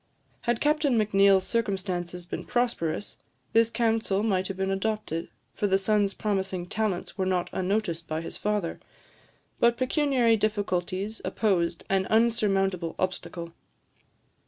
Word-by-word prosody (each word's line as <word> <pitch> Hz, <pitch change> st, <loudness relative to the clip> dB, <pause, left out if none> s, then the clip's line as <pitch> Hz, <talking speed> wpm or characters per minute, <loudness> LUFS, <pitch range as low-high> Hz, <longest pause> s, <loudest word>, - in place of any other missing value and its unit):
Had 240 Hz, -1 st, +2 dB
Captain 295 Hz, -4 st, +2 dB
Macneill's 195 Hz, -2 st, +4 dB
circumstances 185 Hz, -5 st, -2 dB
been 175 Hz, -, -5 dB
prosperous, 230 Hz, -7 st, -1 dB, 0.3 s
this 230 Hz, 0 st, +5 dB
counsel 225 Hz, -4 st, +1 dB
might 190 Hz, -4 st, +1 dB
have 195 Hz, -, -5 dB
been 190 Hz, 0 st, 0 dB
adopted, 195 Hz, -4 st, -2 dB, 0.2 s
for 205 Hz, -, 0 dB
the 195 Hz, -1 st, +3 dB
son's 200 Hz, 0 st, +1 dB
promising 190 Hz, -3 st, -1 dB
talents 205 Hz, -1 st, -2 dB
were 190 Hz, -, +2 dB
not 180 Hz, -2 st, 0 dB
unnoticed 185 Hz, -3 st, -1 dB
by 155 Hz, +1 st, -2 dB
his 165 Hz, -, -7 dB
father; 210 Hz, -5 st, -1 dB, 0.8 s
but 235 Hz, 0 st, +4 dB
pecuniary 255 Hz, -4 st, +3 dB
difficulties 205 Hz, -1 st, -1 dB
opposed 175 Hz, -6 st, 0 dB
an 190 Hz, -1 st, +1 dB
unsurmountable 195 Hz, -6 st, +2 dB
obstacle. 170 Hz, -2 st, -3 dB
195 Hz, 125 wpm, -27 LUFS, 185-220 Hz, 0.8 s, this